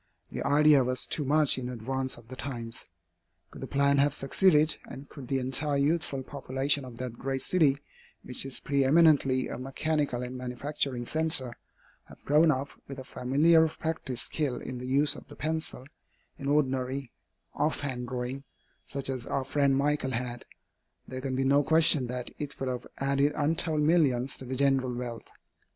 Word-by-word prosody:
The - - -5
idea 145 -1 +5
was 125 +1 0
too 150 - -2
much 145 -1 +3
in 125 -1 -5
advance 130 +2 -3
of 115 - -16
the 130 - -8
times. 120 -7 -5 0.6
Could - - -11
the - - -5
plan 140 0 +2
have 145 0 +3
succeeded, 155 +1 +3
and 140 +1 -10
could 135 -4 -11
the 135 - 0
entire 135 +3 0
youthful 140 -2 0
population 140 +1 -1
of 125 -2 -10
that 120 -1 -6
great 135 0 -2
city, 155 -7 +3 0.5
which 125 - -1
is 135 -1 -4
preëminently 140 -1 +3
a - - -6
mechanical 135 -1 -1
and 125 +1 -6
manufacturing 125 0 -3
centre, 155 -4 +1 0.5
have - - -15
grown 155 +3 +4
up 140 -1 0 0.2
with 135 - -8
a 130 - -7
familiar 150 +7 +3
practised 155 -6 -3
skill 145 -5 -1
in 125 +1 -6
the 125 - -6
use 140 +3 +4
of - - -12
the - - -12
pencil, 160 -4 -3 0.5
in 140 - -7
ordinary, 135 -3 0 0.4
off 155 - -1
hand 125 -4 -3
drawing, 125 +2 -4 0.4
such 140 -1 -3
as 130 -3 -4
our 135 - -1
friend 140 0 +1
Michael 140 -2 0
had, 120 +1 -3 0.6
there 130 0 -6
can 130 -1 -3
be 135 - 0
no 140 +2 +4
question 155 -3 +4
that 125 0 -5
it 145 -1 -5
would 135 - -2
have 125 -1 -5
added 140 +1 +1
untold 155 +1 +1
millions 140 -5 +2
to 130 - -7
the 130 +1 -4
general 135 -2 +1
wealth. 120 -2 -6
135 Hz, 170 wpm, -28 LUFS, 130-150 Hz, 0.6 s, idea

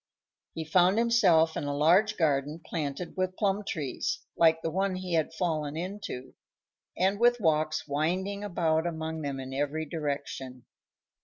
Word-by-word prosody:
He 160 - -4
found 180 +5 +4
himself 190 -9 +4
in - - -3
a 145 0 -2
large 190 +8 +4
garden 150 -1 +1
planted 155 +1 -4
with 185 0 -1
plum 200 0 +1
trees, 150 -8 -3
like 165 -1 +4
the 165 - -1
one 190 +2 0
he 185 -1 -4
had 160 -2 +1
fallen 155 -4 -2
into, 180 -7 -6 0.6
and 190 +3 +2
with 240 +1 +4
walks 155 -5 +1
winding 185 +8 -1
about 165 -4 +1
among 160 -1 -4
them 140 -2 -3
in 130 0 -6
every 145 +3 -1
direction. 140 -5 -5
160 Hz, 150 wpm, -29 LUFS, 150-185 Hz, 0.6 s, found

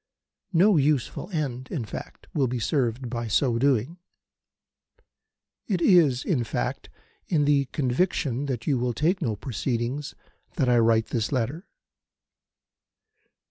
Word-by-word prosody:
No 185 +2 +5
useful 145 - 0
end, 135 -8 -3
in 125 -7 -3
fact, 105 - -9
will 135 -3 +2
be 125 +1 -2
served 120 0 -1
in 115 -1 -3
so 115 +1 +2
doing. 140 +5 +1 1.7
It 190 -5 0
is, 160 -8 +4
in 140 -10 +1
fact, - - -3 0.4
in 150 -4 +2
the 140 -1 +3
conviction 135 0 -1
that 120 -4 -3
you 140 -5 +1
will 120 0 0
take 170 - +1
no 115 -8 -1
proceedings 125 +4 -3 0.4
that 135 -7 +1
I 120 -1 +4
write 115 -1 +3
this 115 -2 -1
letter. 135 - -2
130 Hz, 130 wpm, -26 LUFS, 120-150 Hz, 1.7 s, No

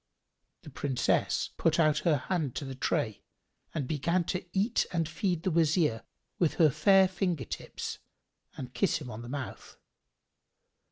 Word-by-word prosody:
The - - -10
Princess 135 -3 0
put - - +2
out 155 -2 +4
her 155 -3 +2
hand 150 -1 -2
to 145 - -3
the 135 - -5
tray 110 -4 -1 0.5
and 140 -5 -3
began 170 +5 +1
to 180 - -3
eat 200 +5 +1
and 165 -3 0
feed 170 +1 -1
the 185 - +1
Wazir 155 -7 +2 0.4
with 170 -4 +2
her 155 -4 +5
fair 190 +7 +5
finger 180 - -1
tips - - -6 0.6
and 125 -2 -7
kiss 120 - +2
him 130 -5 -8
on 110 +2 -7
the 120 - -8
mouth. 140 0 -6
155 Hz, 155 wpm, -30 LUFS, 135-175 Hz, 0.6 s, her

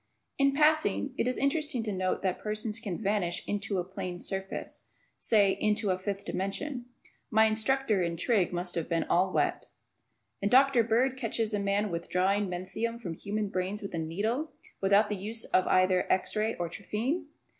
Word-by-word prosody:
In 275 0 +3
passing, 300 -4 +3
it 245 - 0
is 255 - 0
interesting 280 -3 0
to 215 - -2
note 185 -1 -1
that 185 -2 0
persons 215 +1 -3
can 200 -7 -4
vanish 200 -4 0
"into" 205 -1 -2
a 180 - 0
plane 180 -1 -6
surface; 195 0 -5 0.3
say, 205 -4 +4
"into" 210 0 +1
a 185 - 0
fifth 200 +1 -4
dimension. 245 +7 -3 0.4
My 220 0 +5
instructor 220 0 +2
in 170 -1 -1
trig. 200 0 +2
must 175 0 -3
have 170 -1 -3
been 165 -1 +1
all 185 +2 +2
wet. - - 0 0.7
And 200 - +1
Dr. 265 0 +6
Bird 245 +4 +2
catches 230 -3 -1
a 205 - +1
man 200 0 0
withdrawing 185 +4 0
"menthium" 195 +6 -3
from 180 -8 -5
human 205 +4 -3
brains 190 +3 -2
with 200 - -6
a 165 - -2
"needle," 215 - -2 0.3
without 200 +2 +4
the 210 - -2
use 220 +4 -2
of 185 - +2
either 185 0 +3
x 185 0 +1
ray 215 +1 0
or 175 - -2
a - - -5
trephine! 245 - -2
205 Hz, 180 wpm, -29 LUFS, 185-230 Hz, 0.7 s, Dr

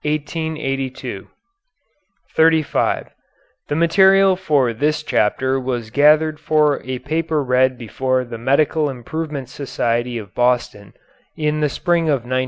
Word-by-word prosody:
] - - -39
[Footnote 145 - -4 1.1
35: 160 -1 +2 0.6
The 145 - -2
material 190 +3 +4
for 145 -10 +1
this 150 +5 -1
chapter 130 +2 0
was 120 -4 -4
gathered 150 +2 +3
for 150 -2 +2
a 130 0 -4
paper 155 +3 -2
read 130 0 +2
before 130 +2 -2
the 115 -1 -8
Medical 145 +4 +1
Improvement 140 +2 -5
Society 120 -2 -2
of 100 -5 -9
Boston 120 -5 -1 0.4
in 150 0 -1
the 150 -1 +1
spring 170 +3 0
of 140 -6 0
1911. 130 +1 -1
140 Hz, 125 wpm, -19 LUFS, 125-155 Hz, 1.1 s, material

